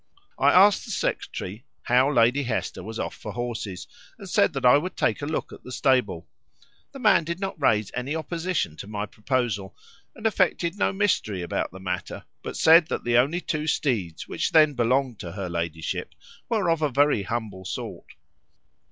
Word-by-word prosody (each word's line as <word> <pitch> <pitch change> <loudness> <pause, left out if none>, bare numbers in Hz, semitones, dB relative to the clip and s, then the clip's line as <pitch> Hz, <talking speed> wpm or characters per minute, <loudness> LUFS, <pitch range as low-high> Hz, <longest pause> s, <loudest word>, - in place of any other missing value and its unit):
I - - +5
asked 195 +2 +6
the - - -11
secretary 100 +6 -3 0.2
how 130 +3 +3
Lady 125 +1 +3
Hester 120 -7 -3
was 110 +4 -7
off - - -3
for - - -8
horses, 115 -6 -5 0.3
and - - -10
said - - +2
that - - -2
I 125 - +8
would 180 +6 -1
take - - +1
a 145 - -3
look 155 - -3
at - - -13
the 125 - -10
stable. 125 - +1 0.6
The 275 - -10
man 255 - +4
did 170 +2 -4
not 190 -4 -4
raise 105 -6 +2
any 130 +5 -3
opposition 165 - -2
to - - -8
my 105 0 -3
proposal, 105 -3 -2 0.4
and 220 - -11
affected 185 -4 +1
no 205 - +1
mystery 185 - 0
about 85 - -2
the 95 - -10
matter, 90 -1 -5 0.2
but - - -6
said 160 0 +7
that - - -3
the 120 0 +3
only 150 +8 +1
two 155 -2 -3
steeds 105 - -1
which - - -1
then 155 -2 +6
belonged 125 -1 +1
to 85 -2 -7
her 95 -1 -4
ladyship 85 -2 -4 0.3
were 205 -7 +1
of 165 -1 0
a 150 - +2
very 140 -3 +3
humble 105 -2 -4
sort. 95 - -7
125 Hz, 185 wpm, -25 LUFS, 105-160 Hz, 0.6 s, I